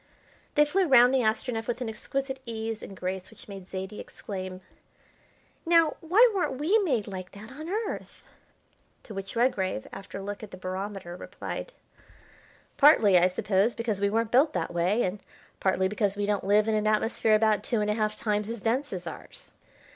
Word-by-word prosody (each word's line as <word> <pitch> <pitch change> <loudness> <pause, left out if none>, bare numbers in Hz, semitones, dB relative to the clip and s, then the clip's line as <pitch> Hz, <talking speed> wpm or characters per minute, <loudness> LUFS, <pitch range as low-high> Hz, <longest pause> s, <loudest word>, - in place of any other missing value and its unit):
They 295 - +6
flew 365 +5 +1
round 250 -2 +6
the 265 - +4
Astronef 225 0 -1
with 240 0 -2
an 250 - -3
exquisite 265 +5 -3
ease 225 -1 -4
and 195 - -9
grace 185 0 -4
which 220 - -15
made 195 -3 -9
Zaidie 190 +2 -6
exclaim: 185 -2 -7 1.0
"Now, 330 -2 +4
why 380 +9 +6
weren't 355 -9 -1
we 345 +11 +3
made 265 - 0
like 185 -2 -7
that 210 +4 -11
on 310 +5 -8
Earth?" 425 +2 -4 0.8
To 220 - -10
which 195 +1 -6
Redgrave, 195 - 0
after 195 0 -8
a 195 - -6
look 205 +1 -5
at 215 - -8
the 185 - -10
barometer, 185 -1 -5
replied: 340 - -7 1.1
"Partly, 220 - +6
I 180 - +5
suppose, 195 +4 +1
because 225 -4 -2
we 200 - +3
weren't 225 +1 0
built 290 +5 +4
that - - -2
way, 180 +7 +1
and 190 +2 -3 0.4
partly 190 0 +2
because 205 0 -1
we 205 - 0
don't 205 -2 -1
live 210 +1 +4
in 220 - +1
an 215 0 +1
atmosphere 215 0 +2
about 215 -1 +3
two 235 - 0
and 210 0 0
a - - +2
half 215 -1 -1
times 210 -1 -1
as 230 -4 -5
dense 260 +6 0
as 180 -2 -5
ours." 160 - -10
215 Hz, 185 wpm, -27 LUFS, 195-250 Hz, 1.1 s, They